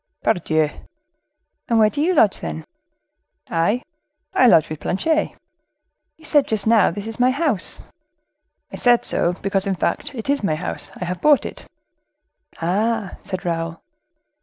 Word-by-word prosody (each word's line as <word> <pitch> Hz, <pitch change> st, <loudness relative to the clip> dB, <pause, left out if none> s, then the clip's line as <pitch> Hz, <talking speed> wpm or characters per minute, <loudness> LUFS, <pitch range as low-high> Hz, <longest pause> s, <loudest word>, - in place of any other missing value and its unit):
"Pardieu!" 155 Hz, -3 st, +1 dB, 1.0 s
"And 230 Hz, -, +3 dB
where 215 Hz, -1 st, +5 dB
do 290 Hz, -, -2 dB
you 355 Hz, +4 st, +2 dB
lodge, 215 Hz, -9 st, +4 dB
then?" 80 Hz, 0 st, -6 dB, 0.9 s
"I? 205 Hz, +10 st, +1 dB, 0.5 s
I 255 Hz, -, +5 dB
lodge 160 Hz, -9 st, +5 dB
with 155 Hz, -1 st, -6 dB
Planchet." 310 Hz, -, 0 dB, 0.8 s
"You 320 Hz, -, -15 dB
said, 295 Hz, -3 st, +4 dB
just 215 Hz, -2 st, -1 dB
now, 225 Hz, -1 st, +5 dB
'This 205 Hz, 0 st, -6 dB
is 225 Hz, +1 st, -6 dB
my 250 Hz, +1 st, +4 dB
house.'" 275 Hz, -, -1 dB, 0.9 s
"I -, -, -7 dB
said 245 Hz, -1 st, +3 dB
so, 175 Hz, -, +1 dB
because, 195 Hz, +1 st, -1 dB
in 195 Hz, -, 0 dB
fact, 285 Hz, -, -2 dB
it 225 Hz, 0 st, -6 dB
is 285 Hz, 0 st, +1 dB
my 155 Hz, -6 st, +1 dB
house. 170 Hz, +4 st, -5 dB
I 180 Hz, -, -5 dB
have 180 Hz, 0 st, -4 dB
bought 300 Hz, -2 st, +4 dB
it." -, -, -8 dB, 0.9 s
"Ah!" 205 Hz, +4 st, -1 dB
said 185 Hz, -3 st, -6 dB
Raoul. 165 Hz, -1 st, -2 dB
205 Hz, 155 wpm, -21 LUFS, 175-250 Hz, 1.0 s, where